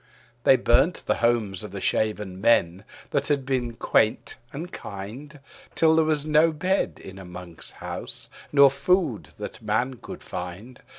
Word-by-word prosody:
They 135 - +8
burnt 130 +8 +3
the - - +1
homes 115 -6 +1
of 105 - -7
the 100 +1 -6
shaven 105 -3 -1
men, 95 -4 +3 0.3
that 140 0 0
had 140 -3 0
been 125 -3 -1
quaint 110 -2 +1 0.2
and 165 +6 -6
kind. 120 +10 -8 0.4
Till 160 -1 +4
there 160 - +5
was 155 -2 0
not 155 +1 +3
bed 190 +4 0
in 95 0 -10
a - - -9
monk's 90 -2 -9
house, - - -7 0.2
nor 140 -2 +7
food 140 - +1
that - - -7
man 120 +4 -1
could - - -10
find. 100 +9 -7
120 Hz, 160 wpm, -25 LUFS, 100-145 Hz, 0.4 s, They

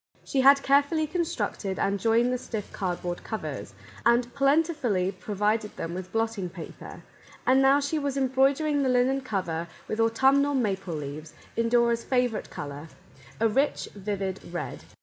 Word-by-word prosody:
She 270 - +1
had 275 +1 +6
carefully 285 +3 +3
constructed 275 - -2
and 200 0 0
joined 230 +4 +3
the 250 - -1
stiff 220 -4 -6
cardboard 175 -2 -3
covers, 220 - -5 0.3
and 240 +1 +3
plentifully 275 - +2
provided 210 +3 -1
them 165 - -4
with 185 0 -6
blotting 225 -5 -1
paper, 170 -1 -10 0.4
and 265 +1 +5
now 270 +1 +5
she 290 +2 -1
was 280 -1 -2
embroidering 275 +3 +2
the 265 - +1
linen 255 +2 +2
cover 175 -9 -3 0.2
with 215 - -3
autumnal 270 +5 +3
maple 195 -8 -1
leaves 150 +1 -7 0.2
in 230 0 +1
Dora's 235 -1 +3
favourite 250 -4 0
colour, 145 +2 -7 0.5
a 225 - +4
rich, 270 +7 0
vivid 195 -2 -3
red. 175 - -5
230 Hz, 150 wpm, -27 LUFS, 195-270 Hz, 0.5 s, had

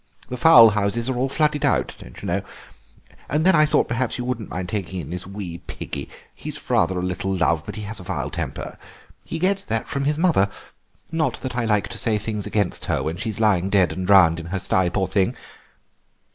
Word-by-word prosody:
The 125 - -4
fowl 120 -4 +8
houses 105 +3 -1
are 130 - -1
all 130 +2 0
flooded 150 0 +1
out, - - +1
you 60 - -11
know. - - 0 0.9
And 155 +4 +1
then 190 - +6
I 155 -1 +5
thought - - +2
perhaps 120 +1 -1
you 125 - -4
wouldn't 120 -4 -3
mind 90 0 -4
taking 95 -1 -3
in 80 -2 -7
this 90 +1 -5
wee 95 -4 -6
piggie; - - -6 0.2
he's - - -8
rather 95 - +2
a 90 - -2
little 90 +1 -2
love, 85 -3 +1
but 105 - -6
he 105 - -6
has 105 +1 -6
a - - -9
vile - - -3
temper. - - -5 0.4
He 165 - -5
gets 195 +3 +1
that 115 0 -1
from 140 0 -2
his 150 +1 +1
mother—not 160 - -1
that 130 -2 -5
I 120 -1 0
like 105 -2 +1
to - - 0
say 110 -3 +3
things 105 -1 -3
against 100 -4 -1
her - - -1
when 80 +2 -3
she's 110 +1 -4
lying 100 -4 +2
dead 100 -3 +3
and 95 -1 -4
drowned 90 -5 +6
in 85 - -7
her 95 +3 -2
stye, 95 -1 +1
poor 95 +1 -1
thing. 95 +1 +1
105 Hz, 215 wpm, -22 LUFS, 95-125 Hz, 0.9 s, fowl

